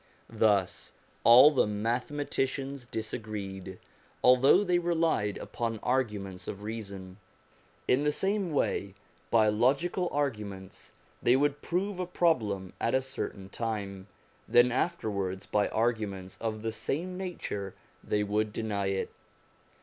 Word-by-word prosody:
Thus 105 Hz, -4 st, +1 dB, 0.3 s
all 125 Hz, +6 st, +9 dB
the 135 Hz, -, +2 dB
mathematicians 135 Hz, +4 st, -2 dB
disagreed, 105 Hz, -5 st, -5 dB, 0.5 s
although 130 Hz, +9 st, +6 dB
they 180 Hz, -3 st, +2 dB
relied 165 Hz, -12 st, +1 dB
upon 115 Hz, -1 st, -3 dB
arguments 105 Hz, -8 st, -1 dB
of 100 Hz, 0 st, -6 dB
reason. 100 Hz, -4 st, -7 dB, 0.7 s
In 130 Hz, +3 st, +3 dB
the 150 Hz, -, +3 dB
same 195 Hz, +2 st, 0 dB
way, 100 Hz, -8 st, -1 dB, 0.3 s
by 110 Hz, -2 st, +4 dB
logical 140 Hz, -, +2 dB
arguments, 105 Hz, -9 st, -4 dB, 0.3 s
they 120 Hz, -, +4 dB
would 145 Hz, +1 st, +1 dB
prove 185 Hz, +2 st, -2 dB
a 180 Hz, -, -2 dB
problem 110 Hz, -, 0 dB
at 115 Hz, -, +1 dB
a 130 Hz, -, +3 dB
certain 100 Hz, -7 st, -5 dB
time, 100 Hz, -4 st, -4 dB, 0.4 s
then 120 Hz, +1 st, +5 dB
after 170 Hz, +2 st, -1 dB
wards 95 Hz, -1 st, -3 dB
by 105 Hz, -1 st, +1 dB
arguments 105 Hz, -5 st, -1 dB
of 110 Hz, -1 st, -3 dB
the 115 Hz, -, -1 dB
same 150 Hz, +12 st, -3 dB
nature 170 Hz, -, -5 dB, 0.3 s
they 105 Hz, 0 st, 0 dB
would 105 Hz, +1 st, 0 dB
deny 105 Hz, -3 st, -2 dB
it. 95 Hz, 0 st, -2 dB
115 Hz, 125 wpm, -29 LUFS, 100-140 Hz, 0.7 s, all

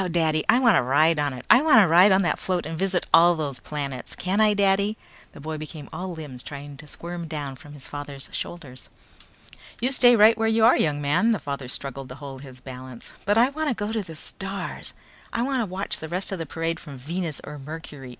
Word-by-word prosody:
Daddy, 160 Hz, -2 st, +1 dB
I -, -, +6 dB
wanna 235 Hz, -7 st, +5 dB
ride 150 Hz, +5 st, +3 dB
on 145 Hz, -1 st, 0 dB
it! 125 Hz, -1 st, -9 dB
I 245 Hz, -, +7 dB
wanna 260 Hz, -, +6 dB
ride 180 Hz, +5 st, +6 dB
on 190 Hz, +1 st, +4 dB
that 175 Hz, -, 0 dB
float 180 Hz, -2 st, -2 dB
and 160 Hz, +1 st, -4 dB
visit 190 Hz, +1 st, 0 dB
all 175 Hz, +1 st, +7 dB
those 145 Hz, -5 st, -3 dB
planets! 140 Hz, -3 st, -5 dB
Can 190 Hz, +4 st, 0 dB
I, 210 Hz, -1 st, +4 dB
Daddy!" 200 Hz, +1 st, +2 dB, 0.4 s
The -, -, -12 dB
boy 155 Hz, +1 st, -5 dB
became 155 Hz, -1 st, -8 dB
all 180 Hz, +3 st, -4 dB
limbs 150 Hz, -7 st, -7 dB
trying 145 Hz, +1 st, -8 dB
to 150 Hz, -, -12 dB
squirm 170 Hz, +2 st, -6 dB
down 145 Hz, -4 st, -5 dB
from 145 Hz, +3 st, -14 dB
his 145 Hz, -3 st, -11 dB
father's 145 Hz, -1 st, -7 dB
shoulders. 135 Hz, -7 st, -7 dB, 0.9 s
"You 250 Hz, +3 st, 0 dB
stay 245 Hz, -2 st, +6 dB
right 220 Hz, +1 st, +7 dB
where 225 Hz, 0 st, 0 dB
you 225 Hz, 0 st, +4 dB
are, 235 Hz, -, +7 dB
young 145 Hz, -2 st, 0 dB
man," 185 Hz, +11 st, +3 dB
the -, -, 0 dB
father 140 Hz, -3 st, -5 dB
struggled 135 Hz, +1 st, -5 dB
to 125 Hz, -, -8 dB
hold 140 Hz, -2 st, -9 dB
his 130 Hz, -2 st, -12 dB
balance. 130 Hz, -2 st, -10 dB
"But 205 Hz, +2 st, +2 dB
I 240 Hz, +3 st, +5 dB
wanna 290 Hz, -2 st, -2 dB
go 205 Hz, 0 st, -3 dB
to 220 Hz, -1 st, -1 dB
the 165 Hz, -5 st, -10 dB
stars. 195 Hz, +4 st, -5 dB, 0.4 s
I 235 Hz, -, -1 dB
can 255 Hz, -6 st, -1 dB
watch 190 Hz, +2 st, -3 dB
the 160 Hz, -, -7 dB
rest 185 Hz, +4 st, -1 dB
of 190 Hz, -, -3 dB
the 165 Hz, -, -4 dB
parade 165 Hz, +2 st, -3 dB
from 145 Hz, -5 st, -10 dB
Venus 160 Hz, +3 st, -4 dB
or 150 Hz, -, -8 dB
Mercury! 145 Hz, -2 st, -9 dB
165 Hz, 220 wpm, -24 LUFS, 145-200 Hz, 0.9 s, I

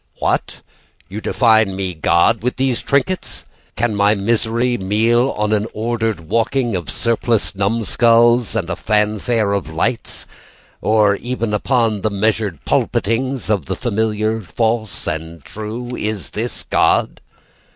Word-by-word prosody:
What? -, -, -1 dB, 0.5 s
You 105 Hz, +3 st, -6 dB
define 110 Hz, -6 st, +3 dB
me 95 Hz, -1 st, -3 dB
God 85 Hz, +7 st, +2 dB
with 125 Hz, +2 st, -1 dB
these 130 Hz, -2 st, 0 dB
trinkets? 145 Hz, +7 st, 0 dB, 0.3 s
Can 120 Hz, -2 st, 0 dB
my 100 Hz, +1 st, +3 dB
misery 115 Hz, +4 st, +1 dB
meal 115 Hz, +5 st, +2 dB
on 105 Hz, 0 st, 0 dB
an 105 Hz, +1 st, 0 dB
ordered 115 Hz, -3 st, -1 dB
walking 115 Hz, +6 st, 0 dB
Of 85 Hz, -6 st, -4 dB
surpliced 115 Hz, -, 0 dB
numskulls? 115 Hz, +3 st, +3 dB
And 100 Hz, -7 st, -1 dB
a -, -, -1 dB
fanfare 105 Hz, +1 st, 0 dB
of 95 Hz, -6 st, -2 dB
lights? 95 Hz, +9 st, -2 dB, 0.6 s
Or 105 Hz, -2 st, +3 dB
even 120 Hz, -2 st, -3 dB
upon 110 Hz, -1 st, +1 dB
the 110 Hz, -, +1 dB
measured 105 Hz, -4 st, -1 dB
pulpitings 125 Hz, +5 st, 0 dB
Of 100 Hz, -10 st, 0 dB
the -, -, -2 dB
familiar 110 Hz, +1 st, -1 dB
false 110 Hz, +2 st, -2 dB
and 80 Hz, 0 st, -5 dB
true? 110 Hz, +7 st, -6 dB
Is 105 Hz, -, -4 dB
this -, -, -5 dB
God? -, -, +2 dB
110 Hz, 130 wpm, -18 LUFS, 100-115 Hz, 0.6 s, define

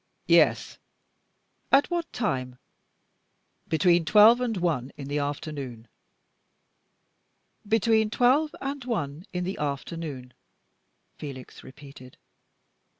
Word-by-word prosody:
"Yes." -, -, +3 dB, 0.9 s
"At 275 Hz, +5 st, +4 dB
what 340 Hz, -1 st, -2 dB
time?" 130 Hz, -, -3 dB, 1.1 s
"Between 170 Hz, +1 st, +3 dB
twelve 215 Hz, +7 st, +6 dB
and 230 Hz, -4 st, -1 dB
one 155 Hz, -8 st, -1 dB
in 140 Hz, -2 st, -7 dB
the 145 Hz, +1 st, -1 dB
afternoon." 140 Hz, -5 st, -5 dB, 1.8 s
"Between 220 Hz, 0 st, +2 dB
twelve 260 Hz, +7 st, +2 dB
and 275 Hz, 0 st, -5 dB
one 170 Hz, -, -4 dB
in 180 Hz, -1 st, -3 dB
the 185 Hz, +2 st, -4 dB
afternoon," 140 Hz, -2 st, -5 dB, 0.9 s
Felix 135 Hz, -4 st, -9 dB
repeated. 135 Hz, -2 st, -14 dB
165 Hz, 90 wpm, -26 LUFS, 140-225 Hz, 1.8 s, twelve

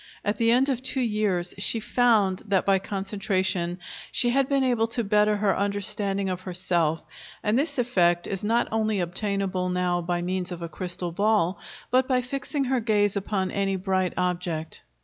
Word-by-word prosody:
At 205 Hz, +1 st, 0 dB
the 230 Hz, +1 st, +2 dB
end 250 Hz, +3 st, +4 dB
of 260 Hz, -3 st, -1 dB
two 265 Hz, +1 st, 0 dB
years 210 Hz, -6 st, 0 dB
she 225 Hz, +3 st, +1 dB
found 220 Hz, -5 st, +2 dB
that 195 Hz, -2 st, +2 dB
by 195 Hz, -1 st, +4 dB
concentration 190 Hz, -3 st, -2 dB, 0.3 s
she 240 Hz, -1 st, +1 dB
had 270 Hz, +1 st, +2 dB
been 275 Hz, -1 st, +2 dB
able 240 Hz, -3 st, +2 dB
to 235 Hz, +1 st, -1 dB
better 210 Hz, 0 st, +3 dB
her 205 Hz, -2 st, +2 dB
understanding 200 Hz, 0 st, -1 dB
of 185 Hz, -1 st, -3 dB
herself; 175 Hz, -4 st, -1 dB, 0.4 s
and 210 Hz, +1 st, +1 dB
this 285 Hz, +5 st, 0 dB
effect 175 Hz, -8 st, +2 dB
is 195 Hz, 0 st, -4 dB
not 230 Hz, +3 st, +2 dB
only 215 Hz, -2 st, 0 dB
obtainable 185 Hz, 0 st, -1 dB
now 180 Hz, -1 st, 0 dB
by 175 Hz, 0 st, -2 dB
means 180 Hz, 0 st, -2 dB
of 175 Hz, -1 st, -6 dB
a 170 Hz, -, -5 dB
crystal 175 Hz, +1 st, -4 dB
ball, 200 Hz, -1 st, +1 dB, 0.3 s
but 255 Hz, +1 st, +3 dB
by 255 Hz, -2 st, +2 dB
fixing 275 Hz, +3 st, -3 dB
her 260 Hz, -1 st, +1 dB
gaze 210 Hz, -3 st, +2 dB
upon 195 Hz, -1 st, -1 dB
any 195 Hz, -1 st, 0 dB
bright 185 Hz, -1 st, 0 dB
object. 175 Hz, -3 st, -2 dB
200 Hz, 175 wpm, -26 LUFS, 180-225 Hz, 0.4 s, end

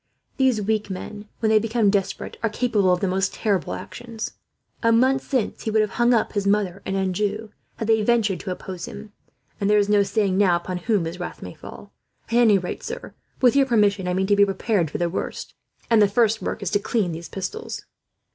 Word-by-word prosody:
These 260 Hz, -6 st, +2 dB
weak 215 Hz, 0 st, 0 dB
men, 205 Hz, +3 st, -7 dB
when 220 Hz, -1 st, +2 dB
they 215 Hz, -, +6 dB
become 225 Hz, -1 st, +2 dB
desperate, 195 Hz, -2 st, -2 dB
are 225 Hz, -, +1 dB
capable 210 Hz, -4 st, +1 dB
of 180 Hz, -, +1 dB
the 195 Hz, -, +1 dB
most 190 Hz, +2 st, 0 dB
terrible 200 Hz, -6 st, 0 dB
actions. 235 Hz, -2 st, -7 dB, 0.5 s
A 230 Hz, -, +3 dB
month 260 Hz, +3 st, +3 dB
since 255 Hz, -6 st, -2 dB
he -, -, -3 dB
would 220 Hz, 0 st, +3 dB
have 210 Hz, -, -3 dB
hung 240 Hz, +1 st, +5 dB
up 230 Hz, -3 st, +2 dB
his 200 Hz, -2 st, -1 dB
mother 200 Hz, -2 st, +1 dB
and 190 Hz, -, -1 dB
Anjou, 205 Hz, +3 st, -1 dB, 0.3 s
had 225 Hz, -, -4 dB
they 220 Hz, -1 st, +4 dB
ventured 215 Hz, -4 st, +2 dB
to 195 Hz, -, -6 dB
oppose 185 Hz, -1 st, -5 dB
him; 210 Hz, 0 st, -9 dB, 0.5 s
and 200 Hz, -, 0 dB
there 210 Hz, -, +5 dB
is 205 Hz, -1 st, +3 dB
no 205 Hz, -1 st, +5 dB
saying, 200 Hz, -1 st, +1 dB
now, 185 Hz, -4 st, +4 dB
upon 180 Hz, +1 st, -3 dB
whom 190 Hz, -1 st, +1 dB
his 170 Hz, +3 st, -5 dB
wrath 175 Hz, -, -6 dB
may -, -, -7 dB
fall. -, -, -12 dB, 0.4 s
"At -, -, -6 dB
any 230 Hz, -4 st, +5 dB
rate, 180 Hz, -1 st, -5 dB
sir, -, -, -7 dB, 0.3 s
with 250 Hz, 0 st, +5 dB
your 275 Hz, -1 st, +4 dB
permission 205 Hz, -5 st, +2 dB
I 180 Hz, -, 0 dB
mean 190 Hz, +1 st, +1 dB
to 205 Hz, +1 st, +3 dB
be 200 Hz, -, +6 dB
prepared 195 Hz, -3 st, 0 dB
for -, -, -4 dB
the 175 Hz, -, 0 dB
worst; 170 Hz, -, -5 dB, 0.3 s
and 230 Hz, -2 st, +4 dB
the 205 Hz, -, +6 dB
first 225 Hz, +1 st, +2 dB
work -, -, -3 dB
is 185 Hz, -, -2 dB
to 205 Hz, -, +2 dB
clean 200 Hz, -3 st, 0 dB
these 165 Hz, +1 st, -7 dB
pistols." 200 Hz, -, -5 dB
205 Hz, 220 wpm, -23 LUFS, 190-225 Hz, 0.5 s, they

